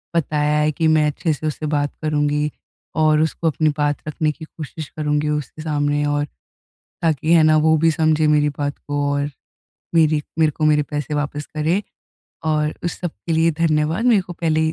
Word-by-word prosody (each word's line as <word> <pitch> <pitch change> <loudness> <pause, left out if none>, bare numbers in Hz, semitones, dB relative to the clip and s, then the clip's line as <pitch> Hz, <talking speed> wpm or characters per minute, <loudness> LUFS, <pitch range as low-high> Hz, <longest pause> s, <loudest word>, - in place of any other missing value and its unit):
बताया 150 -2 +1
है 150 0 +2
कि 160 +2 0
मैं 155 -1 +4
अच्छे 155 +2 -1
से 155 +2 -4
उससे 155 +1 -3
बात 145 -1 0
करूँगी 150 -1 0 0.5
और 155 0 +4
उसको 160 +1 -1
अपनी 155 0 +2
बात 145 -1 +1
रखने 155 0 0
की 160 +1 -10
कोशिश 155 -1 -8
करूँगी 150 -1 -1
उसके 150 +1 -3
सामने। 145 -1 0
और 145 0 0 0.8
ताकि 160 0 +1
है 165 - +6
ना 155 0 +5
वो 160 +1 +4
भी 165 +2 +4
समझे 155 0 +2
मेरी 150 -1 +3
बात 145 0 -2
को 145 0 -3
और 145 +1 -1 0.7
मेरी 155 -2 +4 0.2
मेरे 155 -1 +4
को 155 +1 -2
मेरे 150 -1 +4
पैसे 150 0 -4
वापस 145 0 -2
करें 160 +6 +1 0.7
और 150 0 0
उस 175 - -3
सब 175 -3 -2 0.2
के 165 - 0
लिए 160 +1 +3
धन्यवाद। 160 +5 +1
मेरे 220 -5 +5
को 175 - -8
पहले 160 -2 0
ही 160 0 +1
155 Hz, 190 wpm, -20 LUFS, 150-160 Hz, 0.8 s, है